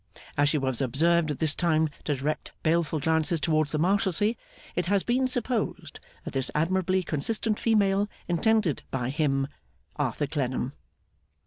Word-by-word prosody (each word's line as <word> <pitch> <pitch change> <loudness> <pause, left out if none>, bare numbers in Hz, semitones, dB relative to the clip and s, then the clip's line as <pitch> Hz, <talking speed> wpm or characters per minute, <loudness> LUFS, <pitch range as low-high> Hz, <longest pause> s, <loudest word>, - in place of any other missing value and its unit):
As 145 0 +3
she 150 - +1
was 130 -3 -1
observed 160 +6 +2
at 145 - -2
this 155 -2 +3
time 160 -2 +2 0.2
to 145 - +1
direct 145 +3 -3
baleful 160 -1 +1
glances 160 +2 +1
towards 155 0 +1
the 155 - 0
Marshalsea, 195 +4 +2 0.4
it 180 -1 -1
has 200 0 +2
been 255 +2 +1
supposed 245 -2 -2 0.3
that - - -6
this 135 -2 0
admirably 185 +4 +1
consistent 210 +8 0
female 205 -2 +2 0.2
intended 200 -1 +2
by 130 -1 -2
'him,' 135 -2 +1 0.5
Arthur 145 - -1
Clennam. 130 -3 -2
160 Hz, 145 wpm, -27 LUFS, 145-195 Hz, 0.5 s, As